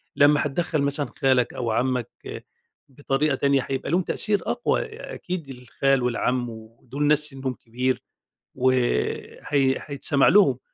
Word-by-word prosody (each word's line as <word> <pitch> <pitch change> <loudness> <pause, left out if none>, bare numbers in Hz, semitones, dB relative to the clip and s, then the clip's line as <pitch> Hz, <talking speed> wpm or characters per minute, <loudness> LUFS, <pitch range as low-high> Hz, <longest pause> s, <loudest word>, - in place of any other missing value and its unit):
لما 145 +1 +5
هتدخّل 155 +1 -1
مثلًا 140 +1 0
خالك 130 -3 +2
أو 120 -2 -2
عمك 125 +1 -3 0.4
بطريقة 140 +1 0
تانية 140 -1 +1
هيبقى 135 +2 -3
ليهم 180 - +3
تأثير 205 +3 0
أقوى، - - 0
آآ 445 +3 -8
أكيد 175 -6 -5
الخال 130 +1 0
والعم 125 0 0
ودول 115 +5 -7
ناس 150 0 +4
سنهم 135 -3 -3
كبير 125 +2 -2 0.5
وهي 130 -1 0 0.5
هيتسمع 140 -1 +1
لهم 205 0 +5
135 Hz, 130 wpm, -24 LUFS, 125-150 Hz, 0.5 s, لما